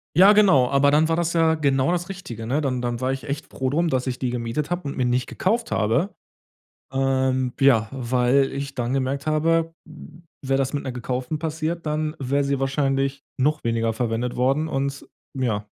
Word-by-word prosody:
Ja 195 +4 +8
genau, 185 -12 +5
aber 140 +1 +4
dann 155 +2 +4
war 165 - +1
das 170 0 0
ja 165 -1 +3
genau 140 -1 +1
das 175 +1 -2
Richtige, 120 - -7
ne? 145 +5 0
Dann 130 -3 -1
dann 120 -1 -2
war 130 +1 0
ich 135 - -5
echt 145 +1 -4
froh 130 -1 -3
drum, 165 +4 +1
dass 130 -1 -1
ich 125 - -2
die 125 -2 -2
gemietet 125 +7 -3
habe 175 -4 -2
und - - -5
mir 125 - +1
nicht 125 +1 0
gekauft 230 +5 -1
habe. 115 - 0 0.8
Ähm, 130 -1 +1
ja, 120 -6 +4
weil 130 +1 +1
ich 140 0 -5
dann 120 +1 -1
gemerkt 135 +2 -1
habe, 165 +2 +1 0.7
wäre 135 0 +2
das 135 0 0
mit 145 - -3
'ner 130 - -3
gekauften 125 +4 -3
passiert, 160 +1 -3
dann 155 +1 -1
wäre 140 +2 0
sie 140 -1 -1
wahrscheinlich 135 0 0 0.2
noch 150 +1 +1
weniger 115 -1 0
verwendet 120 +1 -2
worden 135 +5 +1
und 140 0 -2 0.3
ja, 110 -6 -1
135 Hz, 195 wpm, -23 LUFS, 125-155 Hz, 0.8 s, Ja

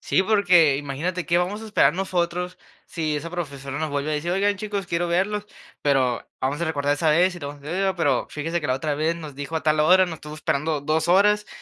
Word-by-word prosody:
Sí, - - +1
porque 180 -8 +4
imagínate, 155 +6 -3
¿qué 175 0 +3
vamos 200 +5 -2
a - - -7
esperar 155 -9 +3
nosotros 180 -1 -2 0.3
si 155 -3 -2
esa 150 +3 -4
profesora 140 -5 -5
nos 155 0 -1
vuelve 145 +1 -2
a - - 0
decir: 160 +4 -2
"Oigan, 200 +2 +1
chicos, 200 -2 -4
quiero 170 +1 0
verlos"? 205 +4 0 0.3
Pero, 130 -4 +2 0.2
vamos 140 +4 -1
a - - +1
recordar 145 -3 0
esa 155 +2 0
vez 175 +4 +3
y - - -7
lo 145 -3 -6
sucedido, 180 +7 -2
pero: 145 -7 +1
"Fíjese 165 +3 -3
que 150 - -3
la 130 - +1
otra 145 +2 -2
vez 160 +3 +1
nos 155 -5 -9
dijo 145 +3 -6
a 160 - -1
tal 155 0 +2
hora, 180 +5 +6
nos 175 -3 -5
estuvo 150 -1 -10
esperando 155 0 -1
2 155 +3 0
horas 210 +3 +4
165 Hz, 225 wpm, -23 LUFS, 145-180 Hz, 0.3 s, hora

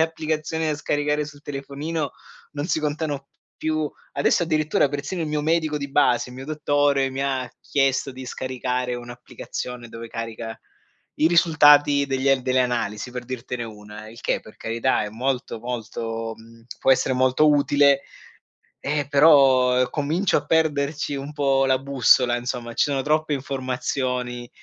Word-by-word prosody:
applicazioni 160 0 -1
da 155 - 0
scaricare 150 0 -1
sul 145 -1 -12
telefonino 145 +2 -4 0.4
non 145 0 -3
si 160 -3 0
contano 150 -1 -2
p - - -51 0.3
più. 155 -1 -1 0.2
Adesso, 140 +4 +2
addirittura, 155 -2 +1
persino 145 +6 -4
il 160 - -1
mio 150 0 -1
medico 155 -1 +1
di 140 -1 -5
base, 125 -3 +2
il - - -11
mio 130 +2 -8
dottore, 145 -3 +1
mi 135 +1 -3
ha 130 -2 -1
chiesto 135 -1 +1
di 130 0 -9
scaricare 125 0 -3
un'applicazione 120 0 -7
dove 115 0 -9
carica 115 0 -6 0.6
i 155 - +3
risultati 145 -4 +5
degli 135 0 +1
delle 130 0 +1
analisi, 120 -2 -1
per 125 0 -6
dirtene 125 -1 -5
una. 105 0 -10
Il 115 +1 -12
che, - - 0
per 110 - -15
carità, 115 +2 0
è 105 - -4
molto, 125 +1 -2
molto 115 -1 -4
mhmm, 115 0 -17 0.2
può - - +3
essere 130 0 +3
molto 130 +4 +4
utile, 140 -1 +4 0.8
ehm, 145 -1 -2
però 135 -4 +5
comincio 160 +6 +1
a 145 - -4
perderci 150 -2 0
un 140 +2 -6
po' 135 -2 +2
la 130 -1 +3
bussola. 130 -2 +3
Insomma, 120 -1 -4
ci - - +3
sono 140 -2 -1
troppe 155 +2 +1
informazioni 125 -2 -3
135 Hz, 155 wpm, -23 LUFS, 125-150 Hz, 0.8 s, risultati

